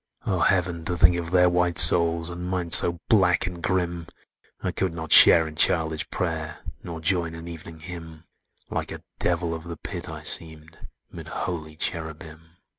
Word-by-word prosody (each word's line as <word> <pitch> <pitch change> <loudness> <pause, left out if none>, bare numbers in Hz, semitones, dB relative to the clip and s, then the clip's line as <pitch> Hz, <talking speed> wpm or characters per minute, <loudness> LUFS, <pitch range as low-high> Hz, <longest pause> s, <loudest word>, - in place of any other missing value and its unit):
"Oh, 95 -4 -2
Heaven! 90 -2 -1
to 90 0 -1
think 85 +2 +3
of 85 -1 -6
their 90 0 +2
white 90 -1 -1
souls, 85 0 +5
And 90 +1 -8
mine 90 -2 -5
so 85 +1 +9
black 95 -4 +1
and 90 -2 -8
grim! 85 -2 -4 0.5
I - - -5
could 95 -3 -4
not 80 -1 -8
share 80 -1 +7
in 80 - -11
childish 80 -1 +1
prayer, 80 -3 -6 0.2
Nor 80 -2 -9
join 85 -1 -2
in 85 +1 -11
Evening 80 -1 -12
Hymn: 80 -2 -11 0.5
Like - - -5
a - - -10 0.2
Devil 85 -1 -2
of 80 -1 -8
the 85 -1 -9
Pit - - -8
I - - -10
seemed, 80 -1 -3 0.2
'Mid - - -12
holy 80 -3 -7
Cherubim! 80 +1 -6
85 Hz, 175 wpm, -23 LUFS, 80-90 Hz, 0.5 s, so